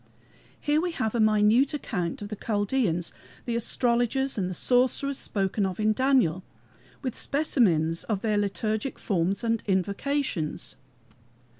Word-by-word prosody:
Here 300 +1 +1
we 350 -1 -2
have 220 -8 -1
a 235 - 0
minute 215 +6 +4
account, 190 - -3
of 205 - -7
the 210 - -4
Chaldeans 205 -5 -1 0.3
the 235 - -2
astrologers 245 +3 +1
and 185 -4 -1
the 185 - -5
sorcerers 260 +5 +2
spoken 195 0 0
of 190 0 -2
in 215 0 +3
Daniel 240 - +2 0.6
with 255 -3 -2
specimens 180 - +1
of 205 -4 -2
their 215 -2 +1
liturgic 215 +4 -2
forms 195 +1 -1
and 230 -1 0
invocations. 200 - -1
215 Hz, 135 wpm, -27 LUFS, 195-255 Hz, 0.6 s, minute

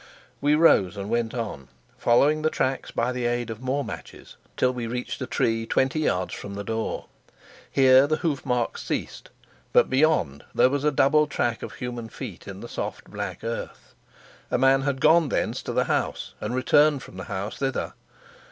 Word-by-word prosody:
We 145 +1 +4
rose 105 - +4
and 100 +2 -5
went 115 0 0
on, 105 - -5 0.3
following 145 +6 +3
the 155 - +2
tracks 135 -3 -1
by 120 +2 0
the 125 -1 -1
aid 120 -1 -1
of 110 +1 -8
more 135 +2 -1
matches - - -9 0.2
till 125 0 +2
we 120 -2 -4
reached 125 +3 -4
a 130 - -3
tree 115 0 0
twenty 135 +6 +1
yards 95 -12 0
from 100 -1 -7
the 100 - -4
door. 110 +2 -3 0.6
Here 130 0 +6
the 155 - +2
hoof 155 -4 -2
marks 125 -2 -1
ceased; - - -4 0.4
but - - +4
beyond 130 - +2
there 130 - +5
was 140 0 -1
a 150 - +3
double 150 +2 +4
track 120 -5 -1
of - - -6
human 120 -2 -6
feet 110 -8 -8
in 100 -1 -8
the 120 - -7
soft - - -6
black - - -5
earth; - - -6 0.6
a - - +1
man 135 +1 +4
had 135 -1 -2
gone 160 -1 +5
thence - - -1
to - - -5
the - - +2
house - - -2
and 105 +4 -2
returned 145 +2 +3
from 95 - -12
the 95 - -6
house 100 +3 -4
thither. 135 -1 -2
125 Hz, 190 wpm, -25 LUFS, 115-140 Hz, 0.6 s, Here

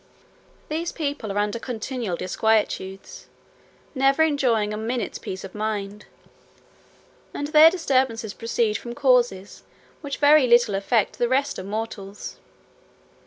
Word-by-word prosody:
These 325 +3 -3
people 285 -9 -3
are 200 - -4
under 210 +2 -1
continual 230 -5 -4
disquietudes, 195 -1 -1 0.7
never 275 +2 +3
enjoying 245 -9 +1
a - - -3
minute's 225 0 -3
peace 190 - -7
of 195 - -9
mind; 210 -1 -4 1.3
and 290 0 -3
their 310 +1 +8
disturbances 260 - 0
proceed 230 -2 -1
from 235 0 -8
causes 245 -8 +1 0.4
which 280 -2 -5
very 295 -2 +5
little 240 -3 +4
affect 200 +3 0
the 240 - +1
rest 275 +2 0
of 185 - -7
mortals. 205 -2 -6
230 Hz, 120 wpm, -23 LUFS, 210-275 Hz, 1.3 s, their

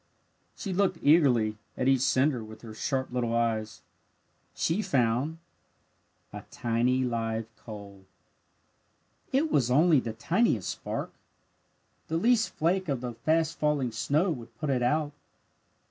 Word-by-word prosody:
She 195 - -4
looked 185 -1 +1
eagerly 125 -9 +4 0.2
at 130 - 0
each 135 -2 +4
cinder 130 -2 +2
with 110 +1 -12
her 110 -2 -9
sharp 130 +4 -2
little 120 -2 -1
eyes. 110 -2 -1 0.7
She 170 +6 0
found 130 - 0 1.0
a - - -6
tiny 120 +3 0
live 115 -2 -2
coal. 100 -3 -11 1.3
It 290 +4 +1
was 125 -4 +2
only 155 +3 +5
the 115 -3 -4
tiniest 140 - +1
spark! - - -4 0.9
The 160 - -1
least 225 +4 +3
flake 180 +2 0
of 135 -4 -1
the 125 -1 -4
fast 155 +7 0
falling 145 -5 +1
snow 150 - +1
would 120 -7 -8
put 150 -3 -2
it 125 -2 +1
out! 145 +4 +1
130 Hz, 130 wpm, -28 LUFS, 115-160 Hz, 1.3 s, only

